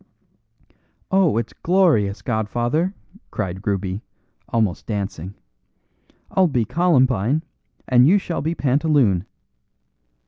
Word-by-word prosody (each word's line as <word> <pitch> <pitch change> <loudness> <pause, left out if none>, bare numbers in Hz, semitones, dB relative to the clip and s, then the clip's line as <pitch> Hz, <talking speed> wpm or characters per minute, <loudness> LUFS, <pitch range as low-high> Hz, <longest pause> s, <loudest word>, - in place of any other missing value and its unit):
"Oh, 190 - +3
it's 115 -1 -3
glorious, 160 - +2
godfather," 120 - -1 0.3
cried 95 +2 -5
Ruby, 100 0 -2 0.5
almost 110 -6 -1
dancing. 100 -3 -4 1.0
"I'll 190 -1 +3
be 125 -7 0
columbine 130 - +2 0.4
and 125 0 +5
you 190 +6 +5
shall 175 -4 -3
be 160 +3 -2
pantaloon." 135 - +2
125 Hz, 95 wpm, -21 LUFS, 100-160 Hz, 1.0 s, and